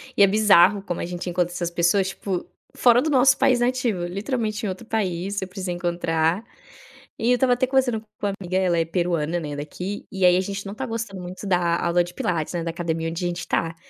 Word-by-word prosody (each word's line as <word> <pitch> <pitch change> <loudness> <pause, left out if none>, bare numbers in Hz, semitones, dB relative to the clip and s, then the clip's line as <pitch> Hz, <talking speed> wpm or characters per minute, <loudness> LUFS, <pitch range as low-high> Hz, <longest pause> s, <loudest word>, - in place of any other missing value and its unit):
E 200 - +6
é - - +7
bizarro 205 -1 +5
como 175 - -4
a - - -2
gente 175 +1 -5
encontra 175 0 0
essas 175 -1 -2
pessoas, 175 +3 +2
tipo, 190 -2 -4 0.3
fora 245 0 +5
do 310 - -1
nosso 265 -1 +5
país 250 -2 +3
nativo, 240 -6 0
literalmente 215 +3 -3
em 200 - -1
outro 190 +5 -6
país, 195 -2 -2
eu 190 - -4
precisei 185 -1 -4
encontrar 175 +1 0 0.8
e 230 - +1
eu 250 - +5
estava 250 0 +3
até 255 +1 +1
conversando 255 -4 +1
com 220 - -25 0.2
uma 200 - -1
amiga, 185 0 -2
ela 180 -2 +2
é 165 - +1
peruana, 170 -1 -1
né, 150 -3 -5
daqui, 180 +7 -6
e 190 -1 +1
aí 180 0 +6
a 185 - +2
gente 200 +1 -5
não 195 - -5
tá 265 +4 -4
gostando 225 -5 -5
muito 180 +3 -8
da 180 -2 +3
a 170 -1 0
aula 175 +1 +3
de 175 +1 -10
pilates, 165 -2 -2
né, 170 - -2
da 165 - -2
academia 165 -1 -2
onde 170 +2 -4
a - - +1
gente 175 0 -3
está, 165 -1 -1
185 Hz, 235 wpm, -23 LUFS, 175-215 Hz, 0.8 s, é